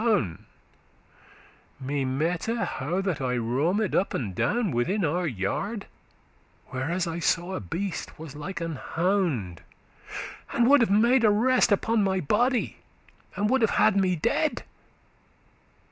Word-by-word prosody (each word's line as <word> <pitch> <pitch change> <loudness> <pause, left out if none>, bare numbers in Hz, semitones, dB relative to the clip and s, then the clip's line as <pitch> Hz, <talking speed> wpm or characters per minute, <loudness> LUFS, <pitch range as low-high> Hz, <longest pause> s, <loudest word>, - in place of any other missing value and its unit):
*Me 140 +1 -2
mette,* 155 +9 -1
how 190 - -1
that 185 -7 -2
I 125 -1 0
roamed 150 - 0
up 195 - +1
and 105 -7 -3
down - - +1
*I - - 0
dreamed* 200 - -1
Within 180 - +1
our 175 +4 0
yard, 155 - -3 0.8
where 130 +3 -3
as 175 +1 0
I 165 0 -3
saw 175 +2 0
a - - -2
beast 180 - -4
Was 155 -3 -9
like 160 +4 -6
an 165 -3 -3
hound, 165 - -1 0.9
and 235 0 +3
would 285 0 +6
have 230 - +3
*made 235 +5 +4
arrest* 230 +4 +4
*siezed* - - +5
Upon 220 +2 +1
my 190 -1 +1
body, 235 - +1 0.6
and 205 - +1
would 265 -1 +3
have 225 - +4
had 215 -2 +4
me 185 -2 +2
dead. 155 - 0
180 Hz, 145 wpm, -26 LUFS, 145-210 Hz, 0.9 s, would